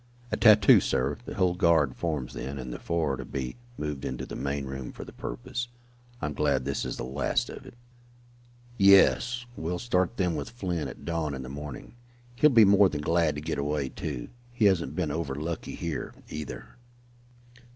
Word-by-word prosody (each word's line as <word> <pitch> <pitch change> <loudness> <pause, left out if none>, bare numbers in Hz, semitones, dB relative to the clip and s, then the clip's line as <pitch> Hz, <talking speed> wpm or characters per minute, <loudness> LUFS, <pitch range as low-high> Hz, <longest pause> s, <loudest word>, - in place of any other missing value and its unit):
"At - - -2
tattoo, 110 -2 +8
sir. 65 +3 0
The - - -6
whole 90 -4 +2
guard 85 -7 +3
forms 75 -7 -3
then, 70 +1 -5
and 65 -2 -5
the - - -6
four 80 -4 0
are - - -3
to 65 - -5
be 65 0 -4 0.2
moved 75 -3 -4
into 65 - -4
the - - -7
main 70 0 -2
room 65 -1 -6
for - - -9
the - - -12
purpose. 90 - -5 0.5
I - - -3
am 75 - -2
glad 65 - +1
this 70 - -2
is - - -4
the - - -4
last 65 +3 -1
of - - -10
it." - - -12 1.0
"Yes, 120 +5 +5
we'll 85 -1 -3
start 95 -1 0
them 90 -4 +1
with 70 -2 -4
Flint 90 -9 -3
at - - -11
dawn 80 -4 -1
in 65 - -6
the 65 - -7
morning. 75 - -7 0.4
He'll 150 +5 +6
be 115 -5 +7
more 100 0 +6
than 75 -3 -3
glad 80 -1 +2
to 75 - -4
get 80 0 -3
away, 70 -1 -1
too. 70 -6 -5 0.2
He 120 -3 +1
hasn't 85 -7 +2
been 80 -4 -1
over 75 -4 -2
lucky 80 +3 -4
here, 85 -3 -4
either." 75 - -7
75 Hz, 195 wpm, -28 LUFS, 70-90 Hz, 1.0 s, tattoo